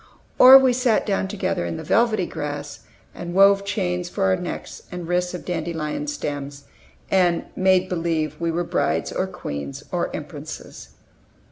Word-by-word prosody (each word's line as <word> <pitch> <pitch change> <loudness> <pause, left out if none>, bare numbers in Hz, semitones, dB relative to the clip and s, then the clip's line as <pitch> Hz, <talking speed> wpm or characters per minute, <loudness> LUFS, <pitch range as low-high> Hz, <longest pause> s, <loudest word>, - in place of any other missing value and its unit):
Or 260 +1 +11
we 260 -2 +4
sat 245 -3 +2
down 195 -2 0
together 190 - -2
in 85 -1 -4
the - - -6
velvety 225 -5 +2
grass, 150 -3 -5 0.3
and 175 0 -7
wove 195 0 +6
chains 180 -3 -2
for 195 - -2
our 190 -1 +3
necks 180 -1 -6
and 180 -2 -6
wrists 180 +1 0
of 180 - -6
the 180 - -4
dandelion 165 - -3
sterns, 145 - -5 0.5
and 180 -3 +2
"made 185 0 +3
believe" 165 -4 -1
we 170 0 -1
were 170 +2 -1
brides, 80 - -1
or - - -1
queens, 70 -1 -6
or - - -1
empresses. - - -8
180 Hz, 160 wpm, -23 LUFS, 160-195 Hz, 0.5 s, Or